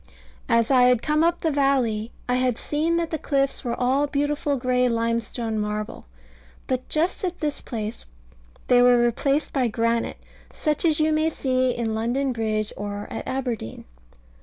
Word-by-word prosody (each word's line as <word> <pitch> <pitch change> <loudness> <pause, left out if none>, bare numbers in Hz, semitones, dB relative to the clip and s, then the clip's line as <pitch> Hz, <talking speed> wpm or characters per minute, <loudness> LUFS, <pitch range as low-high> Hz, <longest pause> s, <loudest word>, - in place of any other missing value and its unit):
As 230 +2 +3
I 250 -2 +6
had 250 -2 +3
come 305 +1 +2
up 340 +1 +1
the 320 - +1
valley 260 -6 +1 0.2
I 250 - +1
had 250 -2 +1
seen 320 +3 0
that 335 -1 -1
the 315 - -2
cliffs 275 -1 0
were 240 -2 -3
all 265 +3 +2
beautiful 290 0 0
gray 250 0 +2
limestone 230 -1 -1
marble; 210 - -4 0.6
but 255 -1 -3
just 335 +6 0
at 360 -1 -2
this 295 -2 -2
place 220 -2 -5 0.6
they 245 -1 +5
were 245 0 +6
replaced 275 +5 0
by 260 -3 +2
granite, 230 +1 0 0.3
such 305 +1 -1
as 315 -2 +3
you 310 0 +3
may 310 +1 +2
see 255 -4 0
in 230 -2 -2
London 245 +5 0
Bridge 215 -2 -1
or 205 0 -5
at - - -5
Aberdeen. 245 - -4
255 Hz, 165 wpm, -24 LUFS, 230-290 Hz, 0.6 s, I